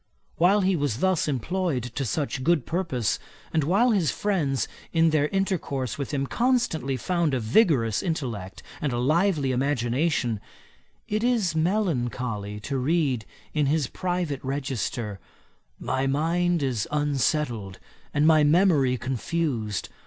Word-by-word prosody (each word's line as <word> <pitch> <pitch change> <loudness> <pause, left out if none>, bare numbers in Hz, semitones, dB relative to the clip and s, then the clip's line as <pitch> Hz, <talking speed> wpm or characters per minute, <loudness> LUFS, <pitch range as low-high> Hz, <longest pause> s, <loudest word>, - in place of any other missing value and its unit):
While 190 +5 +4
he 190 0 +2
was 145 -8 -1
thus 185 +2 +1
employed 150 +1 -1
to 135 - -2
such 135 +1 -2
good 165 -4 +2
purpose, 165 - -1 0.3
and 160 - +2
while 200 - +3
his 185 -9 +2
friends 145 - 0 0.2
in 165 -1 +3
their 150 -2 +2
intercourse 150 - -2
with 140 - -3
him 140 -2 0
constantly 230 - 0
found 170 +1 0
a - - 0
vigorous 115 - +3
intellect 120 - -4 0.2
and 145 - 0
a 120 - -1
lively 155 +2 +2
imagination, 125 -1 0 0.7
it 215 +2 -1
is 230 -8 +2
melancholy 125 - -1
to 135 +5 -2
read 135 -5 +1 0.3
in 150 -2 +1
his 150 0 +2
private 175 -2 -3
register, 130 -6 -3 0.6
'My 130 +1 -1
mind 165 +4 +1
is 125 -5 -1
unsettled 140 -8 0 0.3
and 145 - +2
my 155 -1 +6
memory 150 -5 +4
confused. 125 - -2
145 Hz, 130 wpm, -26 LUFS, 125-170 Hz, 0.7 s, my